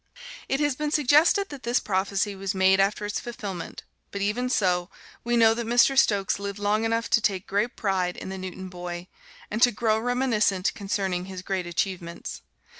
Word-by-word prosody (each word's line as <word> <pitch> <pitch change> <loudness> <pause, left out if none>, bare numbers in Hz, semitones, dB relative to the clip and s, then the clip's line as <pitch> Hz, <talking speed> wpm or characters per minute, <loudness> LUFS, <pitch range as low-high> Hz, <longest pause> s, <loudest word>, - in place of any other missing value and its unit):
It 270 - +1
has 290 -3 +1
been 300 +2 -2
suggested 300 +7 +4
that 285 -3 -9
this 240 0 +1
prophecy 200 +1 -1
was 195 +1 -3
made 190 0 +4
after 200 +2 +1
its 205 - -2
fulfilment, 200 -7 -6 0.3
but 200 - -5
even 210 +5 -1
so, 180 -6 +1 0.3
we 240 0 +1
know 225 -1 +6
that 235 0 -4
Mr. 245 +3 +4
Stokes 200 -7 +2
lived 200 0 -5
long 205 +2 +1
enough 230 +1 0
to 225 - +4
take 195 -3 0
great 210 +5 -1
pride 185 -3 -1
in - - -7
the 190 - -5
Newton 185 0 -6
boy, 175 0 -7 0.4
and 215 +2 -2
to 245 - +7
grow 220 0 +1
reminiscent 225 -5 +1
concerning 195 -3 -2
his 185 -1 -8
great 190 -2 -2
achievements. 175 -1 -4
205 Hz, 185 wpm, -26 LUFS, 190-235 Hz, 0.4 s, to